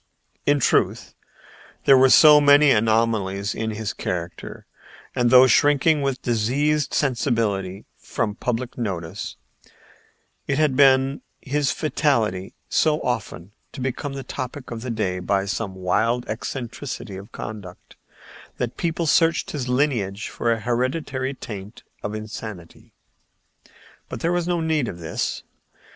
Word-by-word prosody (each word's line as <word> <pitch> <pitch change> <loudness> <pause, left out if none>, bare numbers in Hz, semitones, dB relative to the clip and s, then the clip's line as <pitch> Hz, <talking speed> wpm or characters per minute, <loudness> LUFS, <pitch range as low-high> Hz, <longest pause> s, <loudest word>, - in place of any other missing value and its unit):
In 145 0 +4
truth, - - +1 0.7
there 135 - +7
were 130 0 +6
so 150 +1 +8
many 145 0 +6
anomalies 105 -3 +1
in 110 0 -3
his 110 -1 -4
character, 85 -1 -5 0.5
and, 120 -2 +2
though 130 +1 +8
shrinking 145 +3 +3
with 135 -2 -2
diseased 140 +6 +1
sensibility 115 -8 -1
from 105 - -2
public 125 +3 -4
notice, 90 -8 -4 1.1
it 140 - 0
had 150 -4 +2
been 135 0 +4 0.2
his 140 0 0
fatality 115 - 0
so 150 +9 +2
often 105 -6 -4 0.2
to - - -8
become 130 +2 -3
the 135 -1 -6
topic 130 0 -6
of 115 -1 -5
the 125 - -5
day 100 -5 -1
by 95 +2 0
some 100 -1 -3
wild 110 +7 0
eccentricity 120 -1 -5
of 95 +2 -10
conduct, 100 -5 -9 0.6
that 120 -1 -3
people 170 0 -1
searched 165 +2 +2
his 130 -4 -4
lineage 120 -7 0
for 115 - -1
a 115 -1 -1
hereditary 130 +3 -2
taint 105 -3 -9 0.2
of 105 +1 -4
insanity. 110 -5 -8 1.2
But - - -6
there 170 - +1
was 175 -1 0
no 175 -1 0
need 160 -5 0
of 85 - -6
this. 85 -1 -3
120 Hz, 130 wpm, -23 LUFS, 105-140 Hz, 1.2 s, so